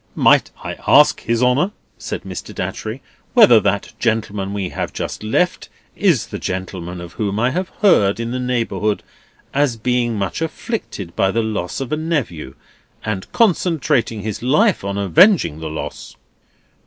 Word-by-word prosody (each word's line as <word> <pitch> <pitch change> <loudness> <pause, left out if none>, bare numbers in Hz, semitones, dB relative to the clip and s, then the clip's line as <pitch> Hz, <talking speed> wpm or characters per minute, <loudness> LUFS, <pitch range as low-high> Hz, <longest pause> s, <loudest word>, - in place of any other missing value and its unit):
"Might - - +4
I - - -5
ask - - +6
His 115 +1 0
Honour," 125 +9 +3 0.3
said - - -5
Mr. - - -7
Datchery, - - -4 0.3
"whether 125 - +8
that 100 -1 -1
gentleman 105 -4 -1
we 100 -3 -3
have - - -4
just - - -4
left 140 +12 0 0.3
is 170 - +2
the - - -7
gentleman 90 -1 -5
of 85 -1 -9
whom 105 -1 -2
I 120 +2 +2
have 180 +5 -2
heard 105 - +4
in 115 0 -3
the 125 - -2
neighbourhood 115 -4 -1 0.5
as 140 -4 +1
being 120 0 0
much 100 - -3
afflicted 160 - -4
by 95 - +2
the 115 +3 0
loss 105 -5 -3
of 135 -3 -5
a 155 - +1
nephew, 135 - -3 0.5
and 100 -3 -4
concentrating 155 - +1
his 110 -2 -4
life 160 - +2
on 100 0 -3
avenging 100 - +4
the 80 -1 -5
loss?" 80 - -7
115 Hz, 155 wpm, -19 LUFS, 100-145 Hz, 0.5 s, whether